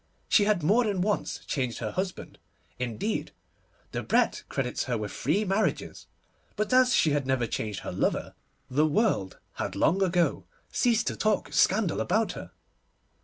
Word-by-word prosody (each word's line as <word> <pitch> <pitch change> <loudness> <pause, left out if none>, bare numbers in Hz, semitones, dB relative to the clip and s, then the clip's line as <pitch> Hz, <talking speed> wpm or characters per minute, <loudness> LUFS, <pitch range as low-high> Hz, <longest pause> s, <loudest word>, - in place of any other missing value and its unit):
She 205 - +4
had 205 -6 +1
more 225 +10 +4
than 200 -4 0
once 205 +2 -1
changed 125 -4 -2
her - - -3
husband; 185 0 -4 0.4
indeed, 125 - -2 0.6
Debrett - - +1
credits 125 -3 -2
her 125 -2 -1
with 105 -1 -4
three 185 - 0
marriages; 195 +3 -1 0.5
but 215 +4 -1
as 255 -1 +5
she 155 - +3
had 145 -2 0
never 130 -2 +1
changed 105 -3 -4
her - - -5
lover, - - -1 0.3
the 150 +4 +2
world 155 - +1 0.2
had 90 - -3
long 170 - +2
ago 180 -2 +1 0.3
ceased 235 -3 +2
to - - -1
talk 215 0 0
scandal - - +2
about - - +1
her. - - -8
175 Hz, 155 wpm, -28 LUFS, 125-210 Hz, 0.6 s, as